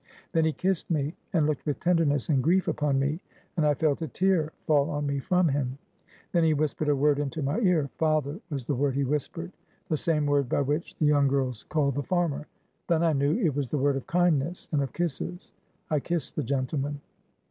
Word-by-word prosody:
Then 165 -2 +2
he 160 - +3
kissed 185 +2 -1
me, 150 -2 0 0.2
and 165 -5 +2
looked 150 -2 -1
with 145 - -1
tenderness 165 -6 +2
and 140 -5 +2
grief 180 +6 +2
upon 150 -4 +1
me; 145 +4 0 0.4
and 160 - +1
I 145 - +3
felt 150 +2 +1
a 160 - -2
tear 175 0 +1
fall 150 -1 +3
on 145 0 -2
me 140 0 -1
from 180 +5 +2
him. 135 -2 -1 0.5
Then 170 -2 +3
he 160 -1 +3
whispered 150 0 0
a 145 - +4
word 145 +1 +3
into 145 +1 -2
my 140 +10 0
ear. 180 -9 +2
'Father,' 155 0 +1
was 140 -6 -4
the 145 - -1
word 135 0 0
he 140 - +1
whispered; 150 +5 -3 0.4
the 155 - +1
same 150 -1 +1
word 145 -3 +2
by - - +2
which 145 +4 -2
the 155 - +1
young 145 -1 +4
girls 130 -4 -1
called 140 -3 +1
the 145 - -1
farmer. 165 -2 -1 0.4
Then 165 -1 +2
I 165 -2 +3
knew 140 +5 +2
it 175 - +1
was 140 -4 -1
the 150 - -1
word 140 0 +2
of 135 - -5
kindness 175 -2 +1
and 150 -3 +2
of 135 -4 -2
kisses. 175 - -4 0.4
I 150 - +3
kissed 170 +2 -3
the - - 0
gentleman. 140 +1 -2
150 Hz, 215 wpm, -27 LUFS, 140-165 Hz, 0.5 s, a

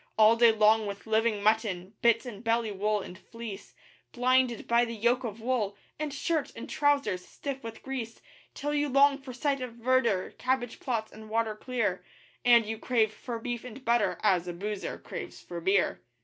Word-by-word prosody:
All 220 +1 +7
day 230 0 +6
long 215 0 +4
with 200 0 -6
living 220 -1 +1
mutton 210 -3 +1
bits 235 +1 +4
and 220 -3 -8
belly 230 -1 +1
wool 210 +1 0
and 180 - -9
fleece; 220 0 -9 0.4
Blinded 255 -1 +2
by 235 +1 +4
the 230 -1 -3
yoke 240 +4 +2
of 225 -2 -5
wool, 220 -5 -1 0.2
and 305 -1 -2
shirt 300 +1 -1
and - - -7
trousers 280 -11 +1
stiff 270 +6 -6
with 225 -1 -8
grease, 245 -4 -5 0.4
Till 295 +1 -2
you 295 0 +1
long 275 +1 +5
for 270 -2 -9
sight 275 +2 -1
of 250 -2 -5
verdure, 235 -5 +1
cabbage 255 -2 -1
plots 230 -4 -2
and 220 0 -12
water 225 0 0
clear, 215 -5 -2 0.4
And 235 -2 +6
you 220 +1 -4
crave 225 -3 +1
for 240 -2 -5
beef 240 0 -4
and 250 +2 -10
butter 235 -2 +2
as 185 -4 +3
a 175 - -3
boozer 205 +3 -4
craves - - -8
for 170 -1 -7
beer. 190 +2 +2
230 Hz, 185 wpm, -29 LUFS, 215-255 Hz, 0.4 s, All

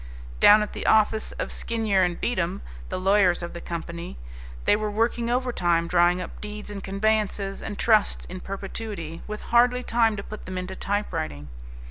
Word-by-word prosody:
Down 210 +1 +8
at 210 - -6
the - - -4
office 220 0 +3
of - - -4
Skinyer 220 -4 0
and 175 -1 -1
Beatem, 190 -5 -1 0.3
the - - -3
lawyers 190 -2 +3
of 170 - -5
the 170 - -7
company, 170 - -6 0.5
they - - +5
were 215 0 -2
working 230 +2 0
overtime 180 -10 +1
drawing 175 +1 +3
up 180 - -7
deeds 210 0 -7
and 200 -1 -6
conveyances 200 0 0
and 205 -2 -5
trusts 215 -3 +3
in 185 - -7
perpetuity, 195 -4 -6
with 210 0 -5
hardly 250 +1 +4
time 230 -2 +2
to 200 - -5
put 215 - -9
them 185 0 -4
into 185 +1 -4
typewriting. 165 - -3
200 Hz, 170 wpm, -25 LUFS, 180-220 Hz, 0.5 s, Down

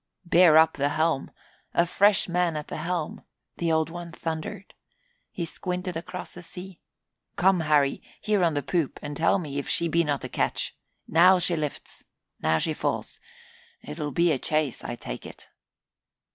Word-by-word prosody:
"Bear 170 -2 +6
up 160 -1 +5
the 140 0 +1
helm! 155 -1 0 0.5
A 170 - +4
fresh 200 +3 +3
man 175 -2 +1
at 150 - -6
the - - -4
helm!" 165 0 -3 0.3
the 170 -1 0
Old 160 0 +1
One 170 0 -7
thundered. 165 +5 -5 0.6
He 170 - -4
squinted 180 +1 -4
across 175 +2 -6
the 175 - -9
sea. 180 +1 -10 0.6
"Come, 190 0 +4
Harry 150 -3 +2 0.2
here 210 -3 +1
on 165 -3 +2
the 145 - -1
poop 160 0 -1
and 145 0 -5
tell 165 +6 +3
me 145 -6 -4
if 140 - -5
she 170 -4 +1
be 170 +1 +2
not 145 -3 -1
a - - -3
ketch. - - -2 0.3
Now 180 +3 +6
she 175 -1 +1
lifts 150 -3 -5 0.4
now 80 +1 +3
she - - -1
falls. - - -3 0.7
'Twill 145 - -4
be 170 +4 +2
a 140 - 0
chase, 155 -3 -1
I - - -4
take - - -7
it." - - -12
165 Hz, 175 wpm, -26 LUFS, 150-180 Hz, 0.7 s, Bear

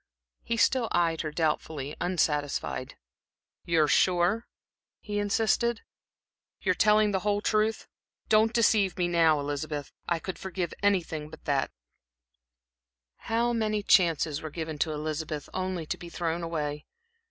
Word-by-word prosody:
He 230 - -2
still 245 0 +3
eyed 165 -2 +1
her 155 - -3
doubtfully, 150 -2 -2
unsatisfied. 150 -5 -1 0.7
"You 165 -2 +3
are - - +2
sure?" 185 +8 +2 0.5
he 205 -1 -3
insisted. 225 +3 +1 0.8
"You 185 - +1
are - - +3
telling 210 +2 +4
me - - -1
the 190 - +1
whole 205 +1 0
truth? 215 +1 0 0.4
Don't 220 +1 +4
deceive 210 -5 +3
me 180 -1 +1
now, 165 -3 +4
Elizabeth; 145 0 -4 0.2
I 170 - +2
could 185 +3 -6
forgive 185 -3 -3
anything 170 -7 0
but 160 0 -13
that." 140 -2 +1 1.6
How 235 +1 +2
many 215 -2 0
chances 165 -6 +3
were 155 - -5
given 160 -1 -5
to 160 - +1
Elizabeth, 155 0 -4
only 185 -3 -2
to - - -3
be 175 - -9
thrown 170 0 -2
away! 150 -3 -3
175 Hz, 140 wpm, -28 LUFS, 155-205 Hz, 1.6 s, telling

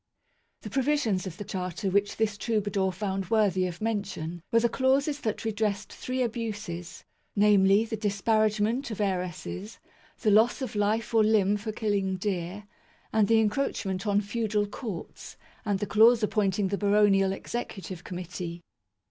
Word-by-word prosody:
The - - -8
provisions 265 -9 +1
of 180 -1 -7
the 205 - -5
Charter 190 -1 -3
which 200 +1 +1
this 220 -2 +1
trouba 210 0 -1
dour 190 -1 +1
found 190 -1 -3
worthy 195 -5 +2
of 175 +2 -8
mention 195 -6 -3
were 230 - +5
the 235 - +4
clauses 275 +4 +1
that 220 -2 -3
redressed 215 -1 -1
three 255 0 -2
abuses, 215 -7 -5 0.3
namely 205 0 +5
the 225 -1 -4
"disparagement'" 215 +4 +1
of 220 - -6
heiresses, 185 +1 -3 0.4
the 215 - +3
loss 220 +4 +4
of 250 - -4
life 215 +3 0
or 225 -1 +5
limb 210 -2 +3
for 210 +2 -4
killing 205 -3 -1
deer, 185 +1 -3 0.5
and 215 -2 +4
the 225 +1 +5
encroachment 210 -3 -1
on 205 0 +3
feudal 210 0 -1
courts, 205 -3 -7 0.3
and 205 -2 +1
the 205 - -2
clause 225 +3 +5
appointing 200 -2 +1
the 200 - -2
baronial 200 -2 +4
executive 195 -4 -5
committee. 175 -1 -6
205 Hz, 150 wpm, -28 LUFS, 190-220 Hz, 0.5 s, were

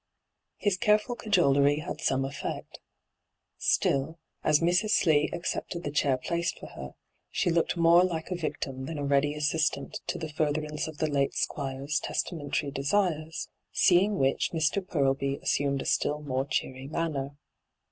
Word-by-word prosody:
His 200 -3 +1
careful 210 +5 +2
cajolery 145 - +3
had - - -6
some 135 0 +1
effect 135 +1 -6 0.8
Still, 140 +4 +1 0.3
as 150 -1 +4
Mrs. 180 +5 +2
Slee 155 -8 +3
accepted 170 0 -3
the 145 - -3
chair 140 -2 +2
placed 170 +5 -2
for - - -10
her, - - -9 0.3
she 175 - 0
looked 165 +1 +1
more 170 +1 +6
like 165 -2 -2
a - - 0
victim 135 -5 -4
than 160 - -5
a 145 - -2
ready 140 +1 +2
assistant 150 -1 0
to - - -2
the 155 -2 -6
furtherance 150 0 -1
of 160 -1 -8
the 155 - 0
late 140 -2 0
Squire's 140 +1 -2
testamentary 145 -3 -2
desires, 155 +1 0 0.2
seeing 195 +3 +4
which 135 0 +1
Mr. 165 +4 +1
Purlby 140 -4 0
assumed 140 -1 +1
a - - -12
still 150 +1 0
more 135 -1 -1
cheery 130 -1 -3
manner. 145 -3 -2
150 Hz, 150 wpm, -28 LUFS, 140-170 Hz, 0.8 s, more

